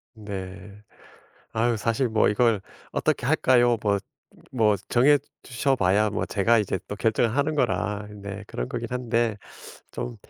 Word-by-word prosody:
네. 100 -1 -8 0.7
아유 115 +1 +1
사실 115 +4 0
뭐 110 -1 +3
이걸 110 -1 +2 0.3
어떻게 - - 0
할까요? 120 -2 +4
뭐 100 -1 +2 0.5
뭐 110 -5 +3
정해 140 +4 +5 0.2
주셔 135 +2 0
봐야 100 0 +2
뭐 105 - -2
제가 115 +3 +2
이제 95 -2 -2
또 - - -5
결정을 115 +2 +1
하는 150 +2 +1
거라 105 -1 0
네 100 0 -8
그런 - - -4
거긴 120 - -4
한데 120 -3 0 0.6
좀 120 -1 -5
110 Hz, 250 characters per minute, -25 LUFS, 100-120 Hz, 0.7 s, 정해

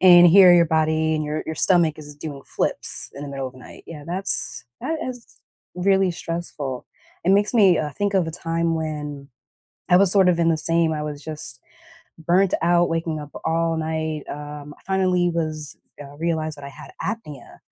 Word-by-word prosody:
and 175 -1 +8
here, 180 0 +8
your 170 -1 +6
body 160 0 +1
and 155 - -1
your 150 +1 -3
your 160 - -4
stomach 170 -4 +3
is 145 -1 -11
doing 145 -2 -7
flips - - -2
in 140 - -8
the 145 - -6
middle 135 -1 -4
of - - -16
the 130 - -16
night. - - -13
Yeah, 150 -3 -9
that's 185 -5 -2 0.2
that 320 0 -2
is 245 -2 -9 0.4
really 190 0 +2
stressful. 165 -6 -5 0.4
It 190 - +3
makes 205 +3 +3
me, 195 -7 +5
uh, 150 -1 -2
think 205 +5 -2
of 180 -4 +2
a - - -3
time 165 0 -1
when 150 -3 -5 0.6
I 180 - +6
was 190 -1 +5
sort 195 -2 +5
of 175 -2 +3
in 165 0 +2
the 160 - +2
same, 165 0 +1
I 150 -1 -2
was 150 -1 -6
just 150 -5 -7 0.6
burnt 180 +4 +2
out, 175 0 +3
waking 165 -2 -2
up 145 0 -9
all 165 0 +1
night, 160 -1 -2
um, 145 0 -8
I - - -25
finally 185 -2 +2
was 155 -3 -3 0.3
uh, 140 0 -12
realized 160 -2 -2
that 140 - -10
I - - -6
had - - -12
apnea, 195 - -6
160 Hz, 195 wpm, -22 LUFS, 150-175 Hz, 0.6 s, and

